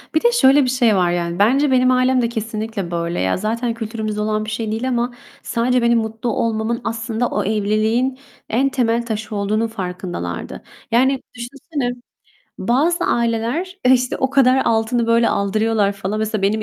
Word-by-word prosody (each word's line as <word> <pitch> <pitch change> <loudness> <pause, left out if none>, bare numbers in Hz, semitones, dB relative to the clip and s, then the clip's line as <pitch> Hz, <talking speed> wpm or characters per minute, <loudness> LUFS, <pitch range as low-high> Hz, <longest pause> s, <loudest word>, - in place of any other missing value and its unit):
Bir 315 - +2
de 475 - +5
şöyle 290 - +5
bir 255 - 0
şey 245 -4 +3
var, 180 -2 +2
yani, 170 0 -2
bence 265 +7 +3
benim 255 0 +4
ailem 255 0 +3
de 235 - 0
kesinlikle 220 -4 -4
böyle. 170 0 -2
Ya, 95 0 +1
zaten 230 +4 -2
kültürümüzde 220 -2 -4
olan 215 0 -1
bir - - -5
şey 220 0 -3
değil 225 +4 -2
ama 240 0 -1 0.3
sadece 250 +1 +1
benim 235 0 +3
mutlu 220 +1 -3
olmamın 225 +1 -1
aslında 225 +1 -2
o 210 - -2
evliliğin 220 +5 0 0.3
en 265 +5 +2
temel 235 -2 0
taşı 220 -1 -4
olduğunun 210 +3 0
farkındalardı. 180 - -5 0.3
Yani, 260 +3 +3
düşünsene, 250 +2 -4 0.7
bazı 295 - +1
aileler, 235 +11 -1
e, 255 - +6
işte, 250 -1 +1
o 265 - 0
kadar 265 -1 +4
altını 230 +1 +1
böyle 230 0 +3
aldırıyorlar 210 +1 +1
falan. 200 +1 -4
Mesela 215 -1 -2
benim 215 +2 +1
230 Hz, 170 wpm, -19 LUFS, 215-250 Hz, 0.7 s, e